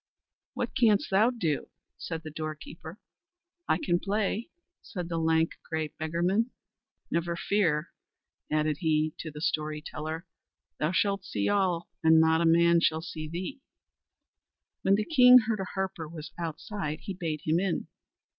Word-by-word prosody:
"What - - -3
canst 220 -6 +3
thou 210 +5 +5
do?" 175 - -2 0.3
said 165 -1 -5
the 155 - -7
doorkeeper. 155 +3 -7 0.7
"I - - +3
can 175 - +1
play," 205 +3 -1 0.3
said 180 -5 -6
the 165 -1 -1
lank, 160 0 +2 0.2
grey 160 -1 -1
beggarman. 175 +10 0 0.6
"Never 170 0 0
fear," 170 -5 +1 0.6
added 155 -1 +1
he 155 -2 +1
to 160 - -5
the 150 0 -9
story 155 -1 -1
teller, 155 +3 -5 0.5
"thou 155 +2 +1
shalt 195 +1 +1
see 185 - -1
all, 185 -4 +1 0.2
and 160 0 +7
not 160 0 +4
a - - +2
man 170 +1 +5
shall 160 -1 +1
see 155 -2 -6
thee." 185 - -5 1.2
When 195 +1 +4
the 210 +1 0
king 250 -5 +8
heard 220 -2 -1
a 190 - -2
harper 190 -4 -3
was 155 -2 -8
outside 165 0 -4
he 195 - -5
bade 165 -5 -3
him 160 +2 +2
in. 190 -2 -1
170 Hz, 150 wpm, -29 LUFS, 155-195 Hz, 1.2 s, king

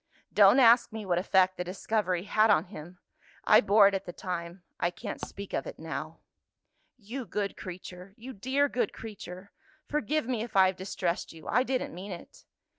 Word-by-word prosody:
Don't 205 +5 +7
ask 235 -1 +6
me 220 -1 -6
what 175 -2 +1
effect 185 0 +3
the 180 - -2
discovery 185 -1 -1
had 215 +2 +3
on 205 - +4
him! 175 +3 -10 0.5
I 215 - +6
bore 205 0 +6
it 200 - +1
at 195 - -2
the - - -4
time 175 0 -6 0.2
I 170 - +1
can't 175 - -7
speak 200 0 -8
of - - -2
it - - -8
now." - - -6 0.8
"You 245 +4 -6
good 200 -1 -3
creature! 185 +1 -9
you 255 +3 -9
dear 265 +7 +1
good 240 -6 -1
creature! 200 -3 -9 0.3
Forgive 300 -1 -1
me 245 -4 -1
if 230 -2 -7
I 190 -1 +7
have 190 0 +1
distressed 185 -2 -3
you; 160 -1 -13
I 250 - +3
didn't 260 0 -2
meant 180 0 -7
it." - - -18
200 Hz, 190 wpm, -29 LUFS, 180-225 Hz, 0.8 s, Don't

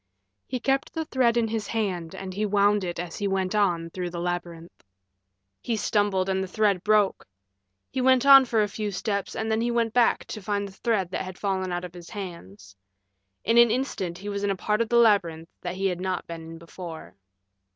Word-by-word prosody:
He 255 - -3
kept 270 +3 0
the 320 0 -2
thread 250 -5 +2
in 230 -1 +2
his 220 -1 -3
hand 185 -7 -2
and 190 -1 -6
he 205 +3 -2
wound 205 0 +3
it 175 -1 -4
as 175 -1 -5
he 205 - 0
went 190 -1 -1
on 175 -5 +1
through 180 0 -4
the 170 0 -6
labyrinth. 175 -1 -5 0.8
He 235 - -1
stumbled 205 -3 +1
and 190 0 0
the - - -5
thread 200 -1 +1
broke. 210 -2 +2 0.6
He 260 - -1
went 260 0 +4
on 275 -1 +9
for 225 -3 +2
a - - 0
few 210 +1 -4
steps 200 -1 -3
and 220 0 -2
then 220 +1 +1
he 240 - 0
went 230 -2 0
back 245 -2 +3
to 215 - -7
find 200 +1 -2
the - - -11
thread 195 -2 -1
that - - -2
had 185 -1 -7
fallen 190 -2 -1
out 175 0 -3
of 175 - -10
his 175 -1 -11
hands. 105 - -9 0.7
In 230 +1 +4
an 235 0 +7
instant 215 -8 -2
he 195 +3 -9
was 200 0 -3
in 205 - +1
a 195 - +1
part 210 +3 0
of 230 - -1
the 240 - +3
labyrinth 175 -8 +3
that 175 0 -4
he 195 +1 -2
had 180 -2 -1
not 185 -2 -2
been 165 -1 -7
in 165 0 -9
before. 165 0 -9
200 Hz, 220 wpm, -26 LUFS, 180-220 Hz, 0.8 s, on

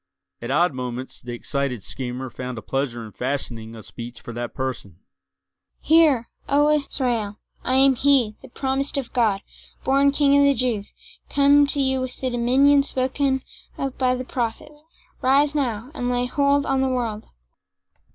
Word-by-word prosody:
At 120 - -5
odd 165 +4 +2
moments 125 0 -6
the 120 0 -7
excited 130 -2 -3
schemer 130 0 -5
found 125 -1 -6
a 110 - -7
pleasure 130 -4 -2
in 110 - -11
fashioning 120 -3 -4
a 110 - -10
speech 120 +3 -9
for 120 - -9
that 120 +1 -5
person: 130 -9 -4 0.8
"Hear, 305 -7 +4 0.2
O 290 +2 +4
Israel! 245 -8 -1 0.3
I 255 - +1
am 270 0 +6
he, 255 -4 +3
the - - -13
promised 270 +2 -2
of 265 -4 -4
God, 220 -6 +2 0.4
born 275 +1 +3
King 280 0 +3
of - - +5
the 280 0 +4
Jews—come 280 - +1
to 285 - +4
you 265 -1 +1
with 255 -1 -5
the 260 -1 -2
dominion 265 +4 +4
spoken 265 0 -1 0.3
of 275 -1 -3
by 255 -1 +2
the 255 0 -5
prophets. 295 +6 -4 0.4
Rise 280 +3 +3
now, 250 -4 -2
and 245 -5 -2
lay 245 0 0
hold 280 +2 +2
on 270 -1 +1
the 265 - +1
world!" 230 -4 -2
250 Hz, 160 wpm, -23 LUFS, -, 0.8 s, am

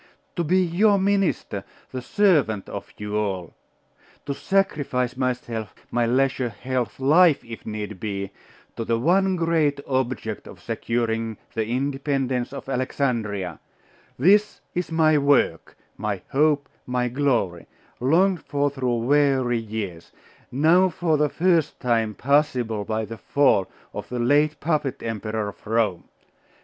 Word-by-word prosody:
To 175 - 0
be 175 +4 +2
your 200 +4 +3
minister 195 -1 0 0.3
the 130 - -4
servant 140 - +2
of - - -7
you 105 0 -4
all 95 -5 -2 0.7
To 140 - -2
sacrifice 140 -9 0
myself, 125 -4 -3 0.2
my 120 -1 +1
leisure, 130 0 +1
health, 125 +2 -3
life, 155 +3 +5
if 115 -1 -9
need 105 -2 -5
be, 100 -2 -4 0.4
to 115 - -3
the 115 0 0
one 185 +8 +3
great 165 -4 +1
object 130 -5 -2
of - - -12
securing 115 -2 -2 0.2
the 110 -1 -1
independence 135 0 -1
of 140 - -8
Alexandria 115 - -2 0.6
This 205 +9 +4
is 180 -1 -3
my 155 -2 +4
work, 140 - +2 0.2
my 100 -3 -3
hope, 145 0 +2 0.2
my 125 0 0
glory 120 -10 0 0.3
longed 170 +7 +3
for 145 0 0
through 125 -4 -1
weary 135 -3 +3
years: 105 -6 -6 0.4
now 165 +8 +4
for 165 -1 0
the 150 0 +2
first 170 -3 +1
time 115 -4 0
possible 125 -6 +1
by 110 +1 -1
the 115 0 -8
fall 140 -9 +3 0.3
of - - -6
the 125 - -3
late 145 +5 +2
puppet 150 -4 -1
Emperor 110 -1 -3
of 100 - -14
Rome. 110 -6 0
130 Hz, 135 wpm, -24 LUFS, 110-150 Hz, 0.7 s, life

